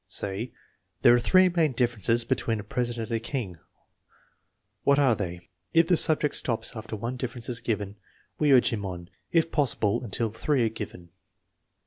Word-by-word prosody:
Say: 100 +5 -3 0.3
" - - -49
There - - +8
are 120 - +4
three 185 +9 +5
main 165 -5 +1
differences 120 -1 +1
be - - +2
tween 115 -2 -2
a - - -6
president 120 +1 -3
and 115 - +1
a 115 - -8
Jang; 110 - -4 1.2
what 140 0 +4
are 135 -5 +4
they? 90 -2 -6
" 95 +2 -47
If 165 0 +5
the 180 - +5
subject 155 -2 +2
stops 115 -1 -2
after 110 0 -6
one 120 +4 -4
difference 120 -1 -4
is 120 -1 0
given, 105 -3 -3 0.4
we 150 -2 +3
urge 130 -2 +6
him 105 -3 -3
on, 90 -1 -7 0.2
if 165 -1 +2
possi 145 -4 +1
ble, 110 +4 +1
until 115 0 -1
three 130 +2 0
are - - +1
given. 105 -5 -8
115 Hz, 190 wpm, -27 LUFS, 105-130 Hz, 1.2 s, There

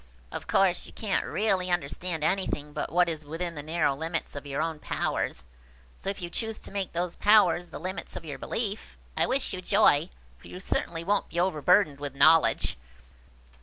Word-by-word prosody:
Of - - -6
course, 185 -2 +2
you - - -14
can't 210 -3 -1
really 195 -3 +1
understand 170 0 -1
anything 155 -5 0
but - - -3
what 175 +1 +4
is 160 -2 -3
within 165 +4 -4
the 150 - -6
narrow 155 -1 +1
limits 165 +2 -3
of 145 0 -7
your 140 0 -3
own 160 -1 -2
powers; 65 - -2 0.5
so, - - -3
if 195 -2 -5
you 175 - -4
choose 225 +2 -2
to - - -10
make 195 -2 -3
those 175 0 -2
powers 200 -4 +4
the - - -8
limits 185 +4 -5
of 165 - -7
your 145 -3 -6
belief, 215 -2 -3 0.2
I - - +2
wish 270 +1 0
you 185 - -4
joy, 180 -5 +4 0.3
for - - -15
you 180 - -8
certainly 170 -3 -2
won't 200 +3 0
be 170 - -3
overburdened 175 -3 +3
with 145 -2 -5
knowledge." 155 - +4
175 Hz, 190 wpm, -28 LUFS, 155-195 Hz, 0.5 s, what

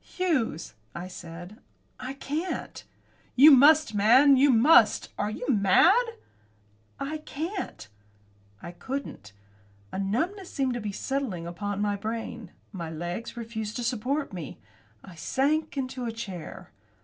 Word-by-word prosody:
"Hughes," 255 - -2 0.2
I 175 +2 -5
said, 175 +4 -10 0.4
"I 260 +1 -5
can't." 305 +6 -4 0.5
"You 290 +5 +9
must, 295 +1 +6
man, 250 +8 +6
you 275 +2 +4
must! 265 +7 +5
Are 210 - -2
you 220 +3 -6
mad?" 210 - +5 1.1
"I 305 +3 -4
can't." 325 - -6 0.8
I 170 - -7
couldn't. 255 - -7 0.6
A - - -4
numbness 330 - -2
seemed 265 -2 -1
to 240 - -4
be 210 -1 -4
settling 210 -7 -3
on 205 +3 -4
my 205 -1 0
brain. 225 0 -5 0.2
My 170 -5 -6
legs 175 +9 -6
refused 220 -2 -5
to 245 - -3
support 250 +3 -2
me. 170 -6 -7 0.5
I 185 - -12
sank 285 - -1
into 255 -1 -3
a 230 - -2
chair. 195 -8 -8
235 Hz, 130 wpm, -27 LUFS, 195-280 Hz, 1.1 s, You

